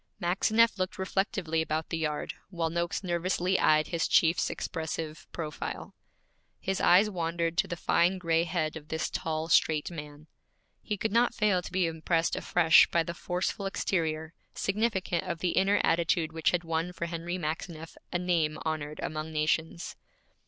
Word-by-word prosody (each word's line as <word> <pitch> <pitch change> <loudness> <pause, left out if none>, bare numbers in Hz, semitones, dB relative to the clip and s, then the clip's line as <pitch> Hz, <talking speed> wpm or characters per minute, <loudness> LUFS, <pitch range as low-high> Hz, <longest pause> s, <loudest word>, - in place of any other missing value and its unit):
Maxineff 215 +4 +2
looked 185 0 -2
reflectively 190 -4 -1
about 160 0 -2
the 165 - -2
yard, 150 -2 -2 0.2
while 170 -4 -2
Noakes 170 +3 -2
nervously 180 +1 0
eyed 155 0 +4
his 170 -2 0
chief's 165 +1 +3
expressive 160 -1 -5
profile. 155 -3 -5 0.7
His 190 0 -2
eyes 185 +4 +6
wandered 170 -3 -2
to - - +2
the 175 - -3
fine 175 +3 +2
gray 165 -2 +1
head 165 -3 -1
of 150 -2 -9
this 160 0 -2
tall, 160 0 -2
straight 155 -1 +3
man. 150 -2 -9 0.6
He 210 - -3
could 220 - -1
not 235 +3 +3
fail 205 -4 +2
to - - -9
be 185 0 +2
impressed 165 +1 0
afresh 160 -2 +5
by 170 - +2
the 170 - -5
forceful 180 +4 -2
exterior, 160 -4 -1 0.2
significant 195 -4 0
of 170 - -3
the 180 +2 -1
inner 195 +2 +3
attitude 165 -1 +1
which 160 -1 +2
had 175 -1 0
won 165 +1 -2
for 170 - -3
Henry 170 +1 -4
Maxineff 165 0 -5 0.2
a - - +1
name 170 -4 0
honored 155 -1 -3
among 155 +1 -4
nations. 160 +2 -1
170 Hz, 160 wpm, -29 LUFS, 160-180 Hz, 0.7 s, eyes